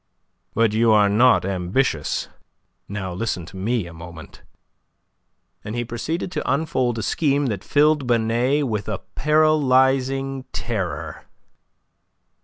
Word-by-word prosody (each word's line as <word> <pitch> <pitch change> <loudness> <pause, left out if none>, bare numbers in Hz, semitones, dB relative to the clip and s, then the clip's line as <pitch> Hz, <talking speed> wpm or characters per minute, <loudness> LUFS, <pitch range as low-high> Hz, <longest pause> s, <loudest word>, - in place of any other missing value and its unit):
"But 115 -2 +2
you 115 +1 +3
are 105 -2 +5
not 120 +1 +4
ambitious. 95 - -1 0.6
Now 95 -2 -4
listen 90 -3 -3
to 90 - -13
me, 105 +2 -1
a 85 - -10
moment." 80 -1 -11 1.2
And 105 - -5
he 120 0 -2
proceeded 160 +10 -4
to - - -2
unfold 130 -5 0
a 110 - -3
scheme 145 +3 +1
that 100 - -7
filled 150 -2 +2
Binet 120 +5 +1
with 105 -3 -3
a 105 - -2 0.2
paralyzing 135 -3 +2
terror. 85 -9 -4
115 Hz, 120 wpm, -22 LUFS, 100-135 Hz, 1.2 s, are